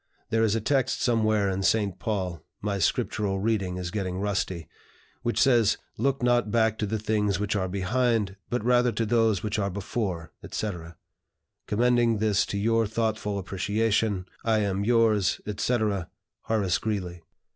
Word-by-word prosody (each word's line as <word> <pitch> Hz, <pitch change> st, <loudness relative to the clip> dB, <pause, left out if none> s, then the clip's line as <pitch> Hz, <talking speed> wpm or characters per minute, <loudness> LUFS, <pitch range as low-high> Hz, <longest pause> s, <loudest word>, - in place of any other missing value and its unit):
There 115 Hz, 0 st, +2 dB
is 110 Hz, -1 st, +2 dB
a 115 Hz, -, 0 dB
text 130 Hz, +2 st, +1 dB
somewhere 110 Hz, -4 st, +2 dB
in 95 Hz, 0 st, -1 dB
St. 100 Hz, -1 st, +1 dB
Paul 95 Hz, -6 st, -3 dB, 0.2 s
my 100 Hz, -1 st, -2 dB
Scriptural 95 Hz, +2 st, 0 dB
reading 100 Hz, -4 st, 0 dB
is 90 Hz, -1 st, -4 dB
getting 95 Hz, -3 st, -3 dB
rusty, 95 Hz, -4 st, -2 dB, 0.5 s
which 120 Hz, -3 st, -1 dB
says, 120 Hz, -6 st, +4 dB, 0.2 s
'Look 135 Hz, +2 st, 0 dB
not 120 Hz, -2 st, +3 dB
back 110 Hz, 0 st, +2 dB
to 105 Hz, -, 0 dB
the 110 Hz, +2 st, -1 dB
things 105 Hz, -2 st, 0 dB
which 105 Hz, 0 st, -1 dB
are 95 Hz, -2 st, 0 dB
behind, 105 Hz, +2 st, 0 dB
but 120 Hz, -2 st, -2 dB
rather 125 Hz, 0 st, +4 dB
to 115 Hz, -, 0 dB
those 110 Hz, -3 st, +2 dB
which 105 Hz, 0 st, -1 dB
are 100 Hz, -1 st, 0 dB
before,' 95 Hz, -3 st, -4 dB
etc. 85 Hz, -5 st, -5 dB, 0.7 s
Commending 120 Hz, +1 st, +3 dB
this 105 Hz, -1 st, +2 dB
to 100 Hz, -, -3 dB
your 115 Hz, +2 st, +2 dB
thoughtful 110 Hz, -2 st, -1 dB
appreciation, 100 Hz, +1 st, 0 dB, 0.2 s
I 110 Hz, -1 st, +2 dB
am, 100 Hz, -1 st, -1 dB
yours, 110 Hz, -4 st, +3 dB
etc. 105 Hz, -3 st, -1 dB, 0.4 s
"HORACE 100 Hz, -6 st, +1 dB
GREELEY." 90 Hz, -6 st, -3 dB
105 Hz, 155 wpm, -27 LUFS, 95-115 Hz, 0.7 s, says